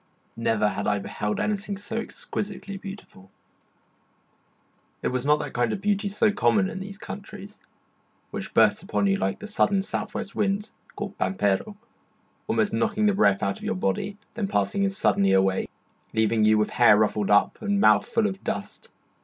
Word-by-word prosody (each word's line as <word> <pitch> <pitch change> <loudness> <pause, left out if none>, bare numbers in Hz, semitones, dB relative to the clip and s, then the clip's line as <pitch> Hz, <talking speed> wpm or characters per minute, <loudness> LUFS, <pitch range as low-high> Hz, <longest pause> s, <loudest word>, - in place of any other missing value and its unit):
Never 115 -2 +1
had 100 - -3
I 105 -1 +2
beheld 105 +1 -3
anything 205 -1 -2
so 205 +3 -6
exquisitely 200 -3 -4
beautiful. 195 - -10 1.7
It - - +1
was 125 +2 -2
not 150 0 +5
that 150 - -6
kind 120 -2 +1
of - - -2
beauty 205 +1 0
so 205 +2 +2
common 205 -1 +2
in 190 - -6
these 200 +1 -7
countries, 205 0 -9 0.7
which - - -5
bursts - - +4
upon - - -1
you 195 0 +2
like - - -1
the - - -9
sudden 200 -2 +1
south - - -4
west 200 - -4
wind 205 +1 -1 0.2
called - - -6
pampero, 95 - 0 0.7
almost - - +1
knocking 210 +1 +1
the 205 - +4
breath 100 - +3
out 100 - -1
of - - -13
your - - -1
body, 95 - -2 0.2
then 215 -3 -2
passing 200 0 0
as 195 0 -2
suddenly 100 - +3
away, 95 0 +2 0.5
leaving 110 0 +2
you 110 0 +5
with 105 - +1
hair 120 -4 +6
ruffled 105 -1 +1
up 105 0 +3
and 205 -2 0
mouth 105 - +5
full 230 -2 +1
of 195 -2 -3
dust. - - -5
195 Hz, 175 wpm, -25 LUFS, -, 1.7 s, hair